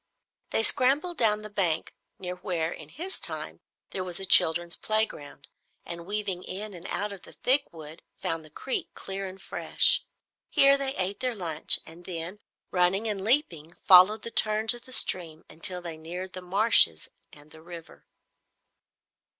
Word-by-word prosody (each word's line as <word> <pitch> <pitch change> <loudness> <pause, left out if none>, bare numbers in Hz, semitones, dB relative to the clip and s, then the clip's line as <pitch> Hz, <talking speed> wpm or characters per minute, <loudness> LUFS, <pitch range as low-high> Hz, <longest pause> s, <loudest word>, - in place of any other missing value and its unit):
They 225 - -1
scrambled 285 +10 +2
down 215 -2 +2
the 215 - -8
bank 175 -6 -2 0.2
near 180 -1 -6
where, 175 -3 -3
in 155 -3 -10
his 355 - -6
time, - - -4 0.3
there 190 - -4
was 180 -2 -6
a 195 - -3
children's 170 -1 +4
playground, 185 -10 -2 0.4
and 170 0 -8
weaving 200 -3 -4
in 205 +2 -7
and 175 +1 -10
out 205 0 -3
of 195 - -12
the - - -15
thick 265 +3 +1
wood, 160 0 -12 0.2
found 165 -1 -2
the 155 - -14
creek, 260 - -4
clear 195 0 -5
and 190 +1 -11
fresh. - - +2 0.5
Here 275 0 +6
they 275 -1 -2
ate 190 +2 -3
their 250 -2 -2
lunch, 165 -5 +3
and 165 +2 -14
then, 175 +3 -7 0.3
running 185 +4 +1
and 200 -3 -4
leaping, 180 - -1
followed 190 +4 +7
the 230 - -6
turns 220 +1 +2
of 240 0 -12
the 255 - -13
stream 165 -9 -1
until 180 +3 +1
they 165 -2 -7
neared 180 +4 -8
the 185 - -6
marshes 180 - +4 0.2
and 150 +1 -18
the 160 - -14
river. 170 -1 -13
185 Hz, 165 wpm, -26 LUFS, 170-215 Hz, 0.5 s, followed